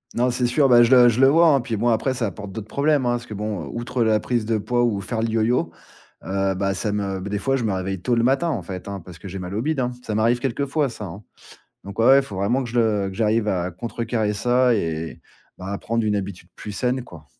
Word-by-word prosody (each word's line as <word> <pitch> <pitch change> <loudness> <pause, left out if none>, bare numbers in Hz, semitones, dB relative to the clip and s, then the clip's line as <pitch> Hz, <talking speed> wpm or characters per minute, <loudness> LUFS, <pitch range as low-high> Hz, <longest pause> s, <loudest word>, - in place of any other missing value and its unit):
Non, 125 +1 +2
c'est 125 0 0
sûr, 135 +3 +3
bah, 120 -1 +7
je 120 - +2
le 125 -2 +8
je 120 +1 -1
le 135 - +7
vois, 165 +5 +5
hein, - - +3
puis, 120 -2 -3
bon, 115 +3 0
après, 120 +3 +1
ça 120 -3 -1
apporte 100 +1 -7
d'autres 110 +1 -7
problèmes, 140 +4 +1
hein, - - +2
parce 120 0 -4
que, 110 - -8
bon, 105 -5 -4
outre 120 +1 -2
la 110 -1 +3
prise 120 0 -1
de 110 0 0
poids 120 +3 0
ou 110 -5 0
faire 110 +2 -3
le 115 - 0
yo-yo, 110 -6 +1 0.5
heu, 95 0 0
bah 95 +1 -1
ça 105 - -1
me 100 -2 -2
beh, 100 +2 -6
des 105 - -1
fois 135 +5 0
je 125 - -3
me 105 - 0
réveille 95 0 -3
tôt 125 - -1
le 115 -1 +2
matin, 135 +7 +2
en 120 -10 -2
fait, 90 +2 -7
hein. 100 -1 -5
Parce 90 -1 -12
que 90 - -10
j'ai 95 +1 -6
mal 90 +1 -6
au 110 - -1
bide, 155 0 -1
hein. 125 -1 0
Ça 110 - -4
m'arrive 115 +3 +2
quelque 135 +2 -2
fois 145 +1 +1
ça, 110 -3 -7
hein. 95 +3 -9 0.6
Donc, 100 +2 -10
ouais, 115 - +3
ouais, 135 +1 +8
il - - +3
faut 100 - -8
vraiment 115 +8 +1
que 120 - -6
je 120 - -1
le 105 -4 +2
que - - -9
j'arrive 110 +1 +1
à 90 -2 -1
contrecarrer 115 +2 -2
ça, 125 +4 +2
et 80 -4 -3 0.4
bah, 90 - -8
à 100 +1 -3
prendre 115 0 -1
une 105 -1 +1
habitude 95 -4 -5
plus 105 - -8
saine, 125 +4 -1
quoi. 85 -10 -13
110 Hz, 285 wpm, -22 LUFS, 100-125 Hz, 0.6 s, le